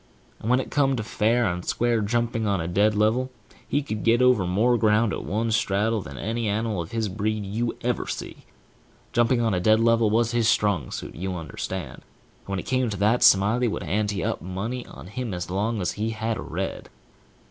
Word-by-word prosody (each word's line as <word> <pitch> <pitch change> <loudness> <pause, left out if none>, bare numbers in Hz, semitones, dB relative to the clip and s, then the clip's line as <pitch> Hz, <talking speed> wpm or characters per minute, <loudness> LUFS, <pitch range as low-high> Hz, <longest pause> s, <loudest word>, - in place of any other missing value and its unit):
And 110 - -4
when 125 +1 +4
it - - -5
came 135 -2 +2
to 115 - -3
fair 110 +3 +1
and 90 -2 -2
square 120 +2 +1
jumping 115 +1 0
on 100 -2 +1
a 80 - -3
dead 100 +5 +2
level, 110 +5 +2 0.4
he 145 +1 0
could 110 -6 -4
get 115 +1 +4
over 125 -7 +4
more 110 +7 +3
ground 110 -1 +3
at - - -4
one 110 +3 -1
straddle 110 +1 +1
than 70 -6 -9
any 115 - -2
animal 105 -2 -1
of 85 - -7
his 115 -2 -1
breed 105 +1 -2
you 115 +4 -2
ever - - -1
see. - - -5 0.8
Jumping 120 0 +3
on 115 -3 +1
a 90 - +1
dead 110 +4 +4
level 115 -1 +3
was 115 +2 +2
his 120 -2 +2
strong 105 - +1
suit, - - -6
you 95 +2 -4
understand; 80 -6 -5
and - - -31
when 100 0 -2
it 90 - -4
come 130 -2 +1
to 100 - -4
that, 110 +4 +2
Smiley 105 +6 +5
would 110 - -3
ante 105 -1 -1
up - - -2
money 105 +8 -4
on - - -11
him 105 +1 -4
as 90 0 -5
long 105 +4 -1
as 90 - -1
he 110 +2 -2
had 110 0 -2
a - - -5
red. - - -5
110 Hz, 215 wpm, -25 LUFS, 100-115 Hz, 0.8 s, Smiley